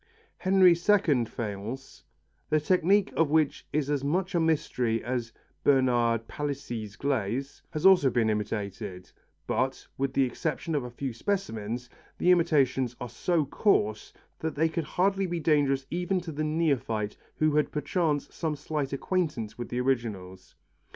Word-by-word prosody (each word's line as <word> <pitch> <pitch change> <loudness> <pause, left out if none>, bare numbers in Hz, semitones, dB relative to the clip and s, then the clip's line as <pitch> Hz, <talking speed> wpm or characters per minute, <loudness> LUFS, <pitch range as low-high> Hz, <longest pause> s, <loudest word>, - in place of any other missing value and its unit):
Henry 185 -1 +6
II 170 - +3
faience, 110 +4 -6 0.5
the 155 - +3
technique 185 +5 +2
of 165 -3 +3
which 155 -1 +1
is 150 -2 0
as 140 -2 0
much 180 +6 0
a 175 - +2
mystery 145 -8 0
as 120 -1 -2 0.3
Bernard 120 -4 +3
Palissy's 120 -8 -4
glaze, 135 0 -2
has 155 +3 -4
also 185 -8 +7
been 120 -3 +1
imitated, 105 -3 -3 0.3
but, 130 +1 -1
with 135 -1 0
the 135 - +3
exception 155 +5 -2
of 145 -4 0
a 125 - -6
few 125 +1 -4
specimens, 120 - -3 0.3
the 180 - +4
imitations 135 -8 +2
are 125 - -5
so 155 +6 0
coarse 110 - +1 0.3
that 160 -1 -3
they 160 +3 +2
could 160 -1 -2
hardly 195 +3 +1
be 175 -1 -2
dangerous 145 -4 +2
even 180 +2 0
to 165 -1 -6
the 155 +1 -3
neophyte 140 -9 0 0.2
who 155 -1 +2
had 150 - +2
perchance 150 0 0
some 160 -3 -2
slight 145 -1 -3
acquaintance 145 - -2
with 120 - -5
originals. 115 -8 -2
140 Hz, 145 wpm, -28 LUFS, 120-165 Hz, 0.5 s, also